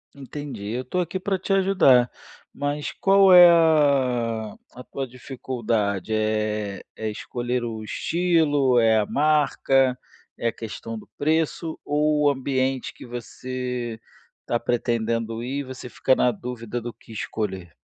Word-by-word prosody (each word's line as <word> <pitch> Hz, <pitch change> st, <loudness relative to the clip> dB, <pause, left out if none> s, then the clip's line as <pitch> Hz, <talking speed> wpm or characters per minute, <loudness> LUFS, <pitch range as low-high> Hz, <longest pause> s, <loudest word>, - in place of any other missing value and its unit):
Entendi. 135 Hz, -6 st, -7 dB
Eu 125 Hz, +2 st, -3 dB
tô 155 Hz, +8 st, -3 dB
aqui 180 Hz, +1 st, -2 dB
para 190 Hz, +1 st, -1 dB
te 190 Hz, +2 st, -2 dB
ajudar! 185 Hz, -11 st, +4 dB, 0.4 s
Mas 145 Hz, 0 st, -3 dB
qual 195 Hz, 0 st, +5 dB
é 180 Hz, -1 st, +10 dB
a 130 Hz, -9 st, +2 dB, 0.2 s
a 125 Hz, -, -10 dB
tua 135 Hz, 0 st, -5 dB
dificuldade, 115 Hz, -5 st, -3 dB
eh, 110 Hz, -2 st, -1 dB
é 110 Hz, 0 st, -3 dB
escolher 120 Hz, +3 st, -3 dB
o 110 Hz, -2 st, -5 dB
estilo, 145 Hz, -2 st, +2 dB
é 110 Hz, -1 st, +4 dB
a 105 Hz, -, +2 dB
marca, 135 Hz, -2 st, +2 dB, 0.4 s
é 115 Hz, -, -1 dB
a -, -, +1 dB
questão 115 Hz, 0 st, -7 dB
do 110 Hz, -, -11 dB
preço 160 Hz, +2 st, -1 dB
ou 150 Hz, 0 st, +1 dB
o 145 Hz, -, +5 dB
ambiente 130 Hz, -1 st, -1 dB
que -, -, -12 dB
você 125 Hz, -1 st, -5 dB, 0.5 s
tá 120 Hz, -, +1 dB
pretendendo 115 Hz, -1 st, -1 dB
ir, 135 Hz, +3 st, -3 dB
você 130 Hz, -1 st, -8 dB
fica 130 Hz, +2 st, +2 dB
na 125 Hz, -, +3 dB
dúvida 120 Hz, +1 st, -6 dB
do 120 Hz, +1 st, -5 dB
que 115 Hz, -, -18 dB
escolher? 95 Hz, -5 st, -4 dB
125 Hz, 140 wpm, -24 LUFS, 115-145 Hz, 0.5 s, é